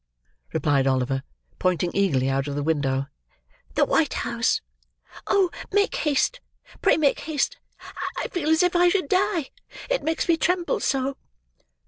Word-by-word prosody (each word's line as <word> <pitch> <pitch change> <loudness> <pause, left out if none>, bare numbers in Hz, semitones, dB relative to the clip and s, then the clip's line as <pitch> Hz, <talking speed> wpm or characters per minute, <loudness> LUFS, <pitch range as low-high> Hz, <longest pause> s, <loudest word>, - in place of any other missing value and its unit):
replied 140 -2 +1
Oliver, 135 0 +1 0.4
pointing 180 -1 +1
eagerly 150 -10 +2
out 135 +1 0
of 140 - -3
the 145 - -2
window. 140 -3 0 0.7
"The - - +4
white 325 - +1
house. 235 0 0 0.7
Oh! 380 -3 +3 0.2
make 410 +2 +2
haste! 300 - +1 0.4
Pray - - +4
make 290 -3 +2
haste! 305 -3 -1 0.6
I - - -2
feel 325 -5 -2
as 320 +3 +4
if 360 0 +1
I 350 0 +5
should 365 -4 0
die: 370 -5 +1 0.4
it - - +2
makes 320 +1 -1
me 335 -2 +4
tremble 355 +1 +1
so." 270 0 -1
275 Hz, 145 wpm, -24 LUFS, -, 0.7 s, I